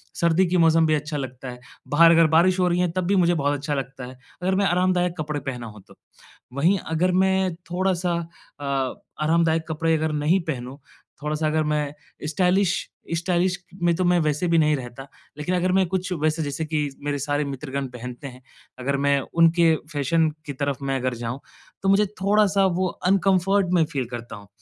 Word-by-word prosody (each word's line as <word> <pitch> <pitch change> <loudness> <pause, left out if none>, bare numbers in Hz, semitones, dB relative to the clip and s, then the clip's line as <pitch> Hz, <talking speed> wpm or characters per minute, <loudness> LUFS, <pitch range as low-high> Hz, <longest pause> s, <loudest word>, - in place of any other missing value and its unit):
सर्दी 170 +2 +3
के 180 +1 +1
मौसम 165 -1 +4
भी 155 - +2
अच्छा 150 0 -3
लगता 130 -1 -6
है, 125 0 -9 0.3
बाहर 165 +3 +6
अगर 165 -1 +5
बारिश 175 +4 +4
हो 180 - +3
रही 175 0 +1
है 180 -2 +1
तब 185 +1 -2
भी 200 - +2
मुझे 175 -2 +3
बहुत 145 -3 0
अच्छा 145 +2 -3
लगता 135 -2 -5
है, 130 - -9 0.3
अगर 190 +1 +1
मैं 200 +1 +2
आरामदायक 180 -1 +1
कपड़े 150 -1 -2
पहना 125 -4 -6
हो 105 -1 -11
तो। - - -17 0.6
वहीं 165 +9 +2
अगर 175 +3 +2
मैं 190 -1 +1 0.2
थोड़ा-सा 180 -1 0 0.5
अ, 145 - -6 0.6
आरामदायक 165 0 +2
कपड़े 160 +1 0
अगर 155 0 -1
नहीं 150 +5 +2
पहनूँ, 130 -3 -4 0.5
थोड़ा-सा 150 +1 -1
अगर 155 0 +1
मैं 150 -1 -1 0.3
स्टाइलिश 180 +3 +1 0.3
स्टाइलिश 180 +1 0 0.3
में 170 -1 +4
तो 185 - -1
मैं 180 0 +4
वैसे 155 +2 0
भी 170 0 +3
नहीं 155 -1 +3
रहता। 130 0 -8 0.3
लेकिन 150 +5 -1
अगर 180 +1 +1
मैं 190 0 +3
कुछ 185 +1 -3
वैसे 155 +1 +1
जैसे 145 +2 -3
कि 155 0 -2 0.3
मेरे 145 0 -1
सारे 145 +1 -1
मित्रगण 140 0 -4
पहनते 125 +2 -8
हैं, 125 -1 -12 0.4
अगर 140 +2 -1
मैं 140 0 +3
उन 165 0 +6
के 165 -2 +5 0.2
फ़ैशन 155 +3 +2 0.2
की 145 - -5
तरफ़ 140 0 -2
मैं 135 0 0
अगर 130 0 -1
जाऊँ, 120 +2 -5 0.4
तो 195 - +1
मुझे 200 +2 +4 0.2
थोड़ा-सा 200 0 +3
वो 185 0 +1 0.2
अनकंफ़र्ट 195 0 +3
मैं 170 -3 +4
फ़ील 140 -4 -3
करता 120 -1 -7
हूँ। 100 -1 -13
160 Hz, 195 wpm, -23 LUFS, 140-180 Hz, 0.6 s, बाहर